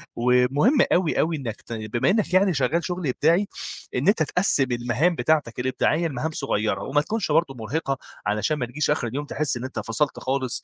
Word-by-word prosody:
ومهِم 125 - +3 0.2
أوي، 175 -3 +1
أوي 165 +1 +1
إنك 115 -6 -6
ت - - -8
بما 110 +1 -1
إنك 205 -2 +1
يعني 190 0 +4
شغّال 145 +4 0
شُغل 180 -3 -3
إبداعي 165 +9 +2 0.5
إن - - 0
أنت 200 -5 +4
تقسّم 155 -4 +2
المهام 120 +8 +1
بتاعتك 150 -8 0
الإبداعية 140 +6 +1
لمهام 150 +2 -3
صغيرة 110 -7 -1
وما 145 +2 +1
تكُونش 215 +8 -2
برضه 165 -5 +2
مرهقِة 135 +4 -2 0.3
علشان 105 +9 0
ما 125 - -1
نجيش 135 +5 -2
آخِر 145 -4 +1
اليوم 140 +6 -4
تحس 145 -2 -1
إن 120 - -6
أنت 130 -3 -5
فصَلت 115 +7 -1
خالص 130 -2 -2
140 Hz, 185 wpm, -24 LUFS, 125-165 Hz, 0.5 s, يعني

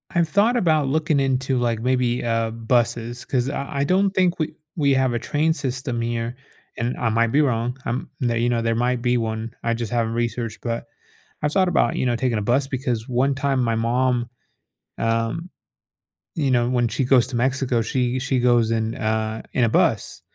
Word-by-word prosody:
I've 170 -2 +3
thought 215 +8 +3
about 155 - +2
looking 155 0 +1
into, 130 -1 0
like, 115 -2 0
maybe, 125 -1 +1
uh, 115 -1 0
buses 120 +1 -1
'cause 130 0 0
I 140 0 -3
I - - +3
don't 190 +5 +2
think 180 -3 +1
we 155 - -2 0.2
we 140 -4 +2
have 130 -2 +2
a 120 - 0
train 155 +5 +1
system 125 -4 -3
here 115 +1 -2 0.4
and 120 +2 -1
I 115 - 0
might 115 +1 +2
be 150 - +4
wrong. 125 -2 0
Um, 120 +2 -3
there, 120 -2 +1
you 120 +1 +1
know, 120 -1 +1
there 115 0 0
might 120 0 0
be 125 0 +2
one. 110 0 -3
I 115 0 +1
just 115 -2 -4
haven't 115 -1 0
researched, 115 -1 -2
but 115 -1 -3 0.6
I 150 - +2
thought 185 +3 +2
about, 120 - +2
you - - 0
know, 120 -1 +1
taking 120 -1 0
a - - -2
bus 130 +5 +1
because 125 -4 -3
1 130 +3 +1
time 135 -1 0
my 115 -1 +1
mom, 120 +1 +1 0.7
um, 115 +10 -1 0.9
you 140 -5 +1
know, 120 -1 +2
when 120 -2 +2
she 135 - -1
goes 125 -2 +4
to 130 - -5
Mexico, 125 -1 +1
she 125 +2 0
she 130 0 0
goes 120 -2 +3
in 110 0 -1
a 110 0 -2
in 125 - +2
a 115 - +3
bus - - +1
125 Hz, 200 wpm, -22 LUFS, 115-135 Hz, 0.9 s, be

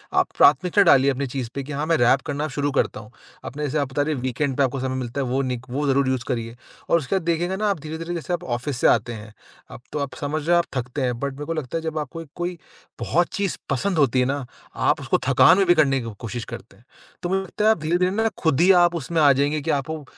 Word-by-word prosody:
आप - - +3
प्राथमिकता 180 +7 +5
डालिए 140 -5 +5
अपनी 140 +1 -2
चीज़ 125 -2 -4
पे 140 - -3
कि 145 - -9
हाँ 145 +2 -2
मैं 165 +1 +2
रैप 120 +2 +4
करना 145 0 -2
शुरू 145 0 -2
करता 140 - 0
हूँ। 110 +1 -13 0.3
अपने 150 +4 -5
जैसे 150 +1 -1
आप 140 -2 -1
बता 145 - 0
रहे 155 +2 0
हैं 130 - -5
वीकेंड 130 +2 -1
पे 140 - +3
आपको 135 0 -1
समय 130 0 -2
मिलता 130 +1 -3
है - - -1
वो 130 +2 0
निक 125 -2 -3
वो 140 +4 -2
ज़रूर 135 -1 +2
यूज़ 130 -2 -1
करिए। 115 -3 -3 0.3
और - - +5
उसके 160 +3 -2
बाद 190 - 0
देखिएगा 170 +2 0
ना 210 +2 -1
आप 195 -5 -1
धीरे-धीरे 160 +3 -6
जैसे 170 +1 -4
आप 175 - -2
ऑफ़िस 125 +2 -3
से - - +5
आते 120 - +2
हैं। 110 -1 -10 0.4
अब - - -10
तो 150 - -3
आप 140 -2 -3
समझ 150 +2 -2
रहे 175 - +4
हो - - +5
आप 170 - +2
थकते 125 +2 -3
हैं। 125 -2 -1
बट 140 0 -3
मेरे 145 +2 -7
को 165 - -2
लगता 155 -1 -3
है - - -3
जब 160 -1 -3
आपको 160 +2 -6
कोई-कोई 175 +3 -5 0.4
बहुत 175 +1 +1
चीज़ 200 -3 -1
पसंद 180 +7 0
होती 135 -4 +3
है 125 - +3
ना, 140 0 -2 0.3
आप - - +1
उसको - - +1
थकान 180 - +6
में 195 - +3
भी 175 - +6
करने 135 -4 +3
की 115 -2 -6
कोशिश 115 0 -5
करते 110 -4 -10
हैं। 115 - -25 0.4
तो 175 - -2
मुझे 190 +1 +1
लगता 210 +3 -3
है 220 - +7
आप 220 - 0
धीरे-धीरे 175 +4 +1
ना 220 +3 +1
खुद 160 -3 +1
ही 185 +2 +6
आप 175 0 0
उसमें 165 +1 -1
आ 145 -2 +7
जाएँगे 145 +3 0
कि 160 +3 -1
आपको 155 +2 -6
145 Hz, 275 wpm, -23 LUFS, 130-165 Hz, 0.4 s, है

